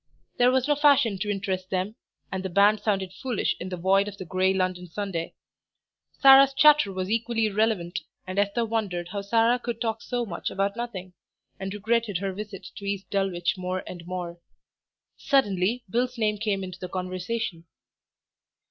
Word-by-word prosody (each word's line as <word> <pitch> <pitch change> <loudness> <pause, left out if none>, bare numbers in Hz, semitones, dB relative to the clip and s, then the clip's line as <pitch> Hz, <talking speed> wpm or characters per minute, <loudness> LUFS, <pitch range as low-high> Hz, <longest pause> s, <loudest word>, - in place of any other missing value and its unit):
There 245 0 +6
was 260 +1 +2
no 295 - +4
fashion 280 -9 +4
to 210 +2 -2
interest 190 -2 -2
them, 190 +2 -1 0.4
and 190 - -2
the 190 - -3
band 200 +4 +4
sounded 195 -3 -1
foolish 245 +2 -1
in 180 - -5
the 180 - -4
void 195 +3 +3
of 205 -1 -7
the 185 - -7
grey 185 +2 +1
London 185 -1 -1
Sunday. 175 -2 -4 0.8
Sarah's 270 0 +8
chatter 295 -6 +6
was 185 +1 -3
equally 230 0 +1
irrelevant, 205 -4 0 0.3
and 185 +2 -2
Esther 205 +3 +1
wondered 200 -6 -2
how 200 +1 -3
Sarah 230 +4 +3
could 240 -2 -4
talk 225 -2 -2
so 245 -1 -2
much 180 -6 -4
about 200 +1 -1
nothing, 195 -7 -6 0.5
and 195 0 -4
regretted 215 0 0
her 195 +1 -3
visit 200 0 -8
to 200 - -8
East 200 -1 -4
Dulwich 190 -2 0
more 185 0 -3
and 175 -2 -8
more. 175 -1 -5 0.8
Suddenly 225 -3 +1
Bill's 245 +5 -1
name 210 -2 0
came 200 -3 -1
into 185 -1 -8
the 180 - -6
conversation. 185 0 -4
200 Hz, 170 wpm, -26 LUFS, 185-225 Hz, 0.8 s, Sarah's